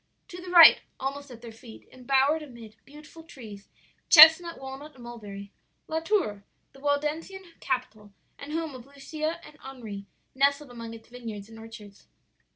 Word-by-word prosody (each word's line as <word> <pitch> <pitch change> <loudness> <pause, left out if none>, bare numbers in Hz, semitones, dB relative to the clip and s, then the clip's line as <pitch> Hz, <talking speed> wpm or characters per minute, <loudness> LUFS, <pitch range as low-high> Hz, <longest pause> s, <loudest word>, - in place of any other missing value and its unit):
To 355 0 -9
the 365 - -9
right, 345 -2 +8 0.2
almost 280 +1 -5
at 240 -2 -13
their 230 - -9
feet, 225 0 -15
embowered 270 +4 +1
amid 235 -7 -12
beautiful 300 +3 -14
trees 220 -11 -13 0.4
chestnut, 325 +2 +8
walnut, 270 +2 -10
and 250 - -14
mulberry 205 -4 -10 0.4
La 320 0 -2
Tour, 320 - -1 0.3
the 270 - -17
Waldensian 300 +7 -2 0.2
capital 215 -5 -4 0.3
and 285 +1 -9
home 320 -2 -3
of 255 0 -12
Lucia 310 +4 -5
and 300 - -16
Henri, 220 -7 -9 0.3
nestled 280 0 +1
among 230 -1 -9
its 225 - -15
vineyards 225 -4 -9
and 225 0 -13
orchards. 220 -3 -13
265 Hz, 155 wpm, -26 LUFS, 225-300 Hz, 0.4 s, right